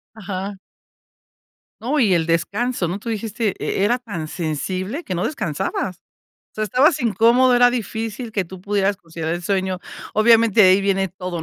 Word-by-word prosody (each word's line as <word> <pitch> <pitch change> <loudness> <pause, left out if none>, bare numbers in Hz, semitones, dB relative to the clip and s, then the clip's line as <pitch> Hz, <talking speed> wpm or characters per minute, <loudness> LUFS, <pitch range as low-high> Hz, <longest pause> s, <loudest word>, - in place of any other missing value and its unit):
Ajá. 195 -1 -5 1.3
No, 270 +7 0
y 215 -7 +4
el 165 -2 +1
descanso, 195 +5 0
¿no? 180 +4 -3
Tú 230 - -6
dijiste, 220 -1 -2
e-era 205 +5 0
tan 205 -11 -6
sensible 185 - -3
que 185 - -4
no 175 - -1
descansabas. 185 - -3 0.6
O - - -64
sea, 215 - -1
estabas 280 - +3
incómodo, 235 +4 +4
era 245 0 +6
difícil 225 0 -4
que 195 -4 -1
tú 185 +1 -11
pudieras 200 0 0
conciliar 165 -2 -6
el 175 - -5
sueño. 190 0 -1 0.4
Obviamente, 225 0 +5
de 185 - +7
ahí 190 +2 +5
viene 195 -1 +1
todo, 180 -2 -6
200 Hz, 165 wpm, -21 LUFS, 185-230 Hz, 1.3 s, de